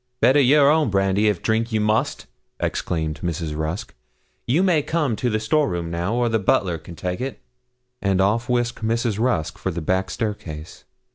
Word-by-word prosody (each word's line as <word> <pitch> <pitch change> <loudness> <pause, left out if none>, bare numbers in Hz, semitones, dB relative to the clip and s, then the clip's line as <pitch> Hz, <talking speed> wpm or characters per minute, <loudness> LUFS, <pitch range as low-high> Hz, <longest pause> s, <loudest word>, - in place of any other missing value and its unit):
'Better 135 +3 +5
your 140 +1 +5
own 155 -5 +2
brandy, 95 +1 +2
if 105 -4 0
drink 115 +1 0
you 110 - +1
must!' 105 +1 0 0.3
exclaimed 80 -3 -2
Mrs. 80 -3 -3
Rusk. 80 +8 -4 0.5
'You 150 +10 +3
may 175 -5 +3
come 150 -6 0
to 125 - 0
the 110 -1 0
store 145 +7 +1
room 85 -1 -3
now, 85 +6 -1
or 120 0 +2
the 110 -1 +1
butler 90 -3 +1
can 85 +2 -11
take 90 +4 -4
it.' 135 +1 -4 0.6
And 95 -1 +1
off 115 +5 +1
whisked 120 -1 0
Mrs. 115 -1 0
Rusk 115 -10 0
for - - -2
the 85 -1 -3
back 95 +4 0
staircase. 85 -8 -5
105 Hz, 185 wpm, -22 LUFS, 90-120 Hz, 0.6 s, Better